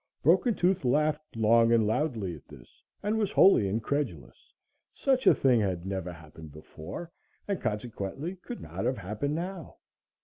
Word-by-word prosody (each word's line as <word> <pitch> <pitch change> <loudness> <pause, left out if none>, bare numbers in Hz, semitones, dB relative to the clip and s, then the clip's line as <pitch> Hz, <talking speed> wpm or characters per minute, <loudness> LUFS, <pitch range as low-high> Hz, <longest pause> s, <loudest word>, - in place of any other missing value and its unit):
Broken 240 -4 +4
Tooth 185 -2 +1
laughed 150 +3 0
long 115 +1 +4
and 115 -2 +4
loudly 110 - -1
at 75 - -16
this - - -16 0.2
and 215 +2 0
was 210 -3 0
wholly 190 - +6
incredulous. 110 - -3 0.4
Such 265 -1 +1
a - - +8
thing 125 -3 +3
had 90 -3 -2
never 95 -2 -3
happened 80 -1 -12
before, 80 - -9 0.4
and 200 -2 -2
consequently 110 - -4
could 240 +6 -8
not - - -5
have 130 - 0
happened 105 +9 -3
now. 175 -1 -6
120 Hz, 150 wpm, -28 LUFS, -, 0.4 s, a